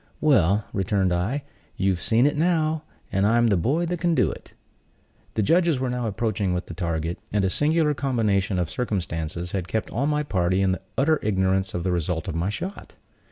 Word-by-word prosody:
"Well," 105 - +3
returned 95 -1 +1
I, 110 +12 -1 0.3
"you've 95 -2 +1
seen 115 +3 +3
it 145 - +2
now, 160 -1 +1 0.3
and 95 0 +1
I'm 120 +1 +4
the 100 - +3
boy 140 - +1
that 175 0 -2
can 170 -1 +1
do - - +3
it." - - -11 0.8
The 110 - +1
judges 170 - +3
were 130 -1 -1
now 125 -2 -2
approaching 105 -3 -1
with 90 - -3
the - - -8
target, 85 -1 -2
and 100 -1 +1
a 95 - +1
singular 155 - +2
combination 110 -9 0
of 90 -3 -1
circumstances 85 -6 -3
had 95 -3 -3
kept 110 +3 -2
all 135 +5 0
my 150 0 +1
party 95 -6 +1
in 95 -1 +1 0.2
utter 155 +3 +3
ignorance 95 -2 +1
of 85 - -2
the 95 - 0
result 85 -1 -1
of - - -2
my 85 +4 -1
shot. 180 - -6
100 Hz, 195 wpm, -24 LUFS, 90-140 Hz, 0.8 s, I'm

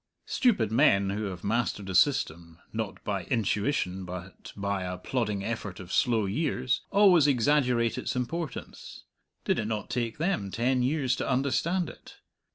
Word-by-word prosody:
Stupid 195 - +2
men 100 -6 +4
who 105 +2 -2
have 90 -3 -6
mastered 105 -2 -1
a 95 - -4
system, 85 - +1 0.2
not 110 -2 -4
by 100 -4 -2
intuition 105 -4 0
but 90 +1 -8
by 100 -1 -1
a 90 0 -4
plodding 105 -1 -2
effort 105 -4 -4
of 95 -2 -8
slow 115 -4 +2
years, 125 +3 0
always 185 -7 +6
exaggerate 125 -3 +2
its - - -3
importance 135 +3 -5 0.4
did - - +1
it 110 - -1
not 110 -2 -3
take 120 -2 -2
them 165 - -1
ten 125 +5 +1
years 130 0 +1
to - - -2
understand 150 +7 +1
it? - - -12
115 Hz, 155 wpm, -28 LUFS, 100-135 Hz, 0.4 s, always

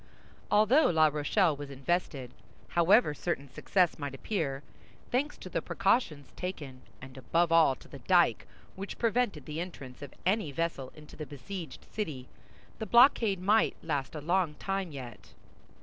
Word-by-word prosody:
Although 215 +9 +5
La 160 -2 +4
Rochelle 150 +3 +1
was 145 0 -8
invested, 140 -2 -2 0.4
however 175 0 +4
certain 145 -2 -3
success 175 +6 +1
might 145 -2 -4
appear—thanks 175 - -4
to - - -10
the - - -2
precautions 150 - 0
taken, 145 -8 -6 0.2
and 135 0 -11
above 170 +5 +1
all 165 -5 +5
to - - -17
the - - -11
dyke, - - +3 0.3
which 195 +1 -7
prevented 225 - 0
the 150 +3 -5
entrance 140 -8 -9
of 140 -2 -9
any 190 -5 +1
vessel 155 -3 -3
into 150 -1 -13
the 155 -1 -7
besieged 165 +1 -8
city—the 155 - -8
blockade 235 -4 +5
might 210 +4 +3
last 140 +1 -2
a 150 - -5
long 170 0 +1
time 195 -1 -3
yet. 125 -6 -10
165 Hz, 145 wpm, -30 LUFS, 140-195 Hz, 0.4 s, Although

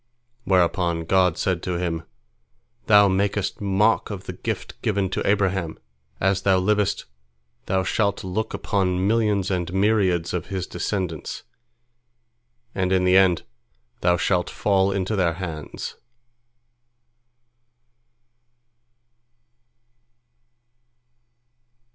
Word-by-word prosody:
Whereupon 85 -3 +2
God 90 0 +3
said 90 -2 -1
to 90 -1 -2
him: 85 -2 -2 0.9
"Thou 105 -1 +7
makest 100 +1 -1
mock 100 0 +2
of - - -6
the - - -6
gift - - -5
given 100 -3 0
to - - -1
Abraham! 95 -5 0 0.4
As 95 +1 +1
thou 95 -1 +3
livest, 105 +2 +1 0.6
thou 95 0 +1
shalt 100 +1 0
look 100 +4 -3
upon 95 -2 0
millions 105 -3 +1
and 90 -2 -2
myriads 95 -4 +1
of 90 -3 -3
his 95 -2 -3
descendants, 90 -8 -4 1.3
and 95 -1 -1
in 95 -1 +3
the 90 0 +4
end 95 -3 +4 0.6
thou 90 0 +2
shalt 90 +2 0
fall 100 -1 +1
into 100 +2 -1
their 90 -4 +2
hands." 80 -4 -6
95 Hz, 100 wpm, -23 LUFS, 90-100 Hz, 1.3 s, Thou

